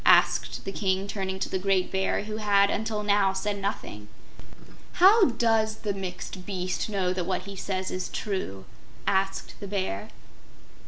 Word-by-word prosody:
asked - - +4
the 195 - -3
King, 195 -1 0
turning 190 -2 -3
to - - -2
the 190 - -2
great 190 -1 +1
Bear, 190 +1 0
who 215 0 -5
had 200 -2 +4
until 215 0 -1
now 200 -2 +3
said 200 +1 -2
nothing. 105 - -4 0.9
"How 390 +3 +7
does 225 -3 +2
the 210 -2 -3
Mixed 185 -1 -6
Beast 185 +1 -2
know 190 -3 0
that 180 -2 -2
what 185 -1 -1
he 200 +1 -8
says 190 -1 -3
is 185 0 -3
true?" 185 - -3 0.4
asked 195 0 0
the 200 - -6
Bear. 190 - -2
195 Hz, 160 wpm, -27 LUFS, 190-210 Hz, 0.9 s, How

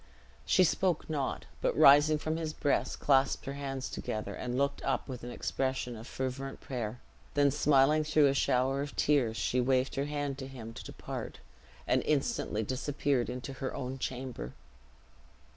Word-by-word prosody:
She 185 - +5
spoke 180 0 +1
not, 140 -4 -2 0.2
but - - 0
rising 145 +2 +7
from 155 +2 -2
his 160 -2 -3
breast, 145 - 0
clasped 135 -1 +3
her 135 - -4
hands 135 -2 -4
together, 110 - -4
and 125 0 -3
looked 140 +1 0
up - - -1
with 125 -3 -7
an 120 - -5
expression 130 0 -2
of 115 +2 -9
fervent 130 +1 -4
prayer; 120 -3 -4 0.4
then 145 -1 +4
smiling 145 +1 +4
through 155 -1 +4
a 135 - +4
shower 135 0 +2
of 145 0 -5
tears, 130 -7 +2
she 125 +5 +1
waved 130 +1 +2
her 140 - -1
hand 145 -2 -3
to 130 - -5
him 115 -4 -8
to - - -8
depart, - - -6 0.5
and - - +2
instantly 135 -6 0
disappeared 130 +1 -1
into 125 +2 -5
her 130 - -2
own 130 +1 -4
chamber. 125 - -5
135 Hz, 165 wpm, -31 LUFS, 125-145 Hz, 0.5 s, rising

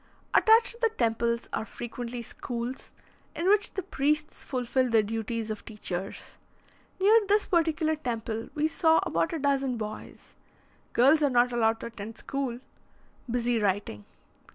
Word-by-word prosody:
Attached 450 +1 +5
to 470 - -14
the 460 - +4
temples 235 - 0
are - - -1
frequently 240 +1 -6
schools, 240 +2 -6 0.4
in 340 - -1
which 415 +1 +3
the 380 - -2
priests 300 -3 -1
fulfil 255 0 0
the 225 -2 +4
duties 225 +1 -3
of 215 - -6
teachers. 195 -3 -6 0.6
Near 420 +4 +6
this 415 +1 +3
particular 320 -2 +1
temple, 230 -5 -4
we 305 +1 +2
saw 320 0 +3
about 165 0 0
a 330 - -2
dozen 275 -3 0
boys 215 -1 -8 0.6
girls 275 +6 +5
are 290 - +4
not 245 -1 +3
allowed 225 -1 +1
to - - -5
attend 225 -1 -8
school 270 -2 -3 0.7
busy 240 0 +1
writing. 190 - -1
245 Hz, 145 wpm, -28 LUFS, 225-310 Hz, 0.7 s, Near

